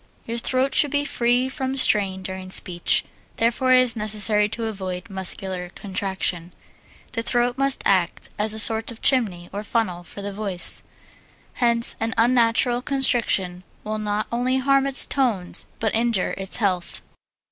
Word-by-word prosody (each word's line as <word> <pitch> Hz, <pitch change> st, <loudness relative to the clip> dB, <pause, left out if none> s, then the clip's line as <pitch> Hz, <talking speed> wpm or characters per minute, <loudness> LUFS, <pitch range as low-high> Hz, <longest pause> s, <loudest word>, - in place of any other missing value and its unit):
Your 230 Hz, +1 st, -2 dB
throat 260 Hz, +3 st, 0 dB
should 295 Hz, -, +4 dB
be 290 Hz, +1 st, -1 dB
free 245 Hz, -1 st, +1 dB
from 265 Hz, 0 st, -4 dB
strain 195 Hz, -7 st, +2 dB
during 190 Hz, 0 st, -7 dB
speech, 175 Hz, -2 st, +1 dB, 0.3 s
therefore 240 Hz, +3 st, +1 dB
it 255 Hz, -, +6 dB
is 245 Hz, -2 st, -1 dB
necessary 210 Hz, -1 st, +1 dB
to 230 Hz, +1 st, -4 dB
avoid 190 Hz, -1 st, -6 dB
muscular 190 Hz, -1 st, -3 dB
contraction. 190 Hz, -3 st, -3 dB, 0.6 s
The 230 Hz, -, -3 dB
throat 240 Hz, +1 st, 0 dB
must 275 Hz, 0 st, +1 dB
act 185 Hz, -3 st, +1 dB
as 215 Hz, +1 st, +1 dB
a -, -, -4 dB
sort 220 Hz, 0 st, +3 dB
of 235 Hz, -2 st, -9 dB
chimney 200 Hz, -10 st, +3 dB
or 205 Hz, -, -4 dB
funnel 205 Hz, -5 st, -2 dB
for 200 Hz, +3 st, -10 dB
the 200 Hz, 0 st, -5 dB
voice, 195 Hz, -3 st, -2 dB, 0.7 s
hence 235 Hz, -1 st, +4 dB
any 225 Hz, 0 st, -1 dB
unnatural 240 Hz, +1 st, +2 dB
constriction 230 Hz, -10 st, 0 dB, 0.2 s
will 215 Hz, 0 st, -4 dB
not 210 Hz, 0 st, -2 dB
only 250 Hz, +2 st, 0 dB
harm 275 Hz, +1 st, +2 dB
its 275 Hz, -1 st, +3 dB
tones 230 Hz, -10 st, 0 dB
but 220 Hz, -2 st, -1 dB
injure 230 Hz, -4 st, +1 dB
its 195 Hz, -1 st, +5 dB
health. 185 Hz, -6 st, -2 dB
220 Hz, 155 wpm, -22 LUFS, 190-245 Hz, 0.7 s, it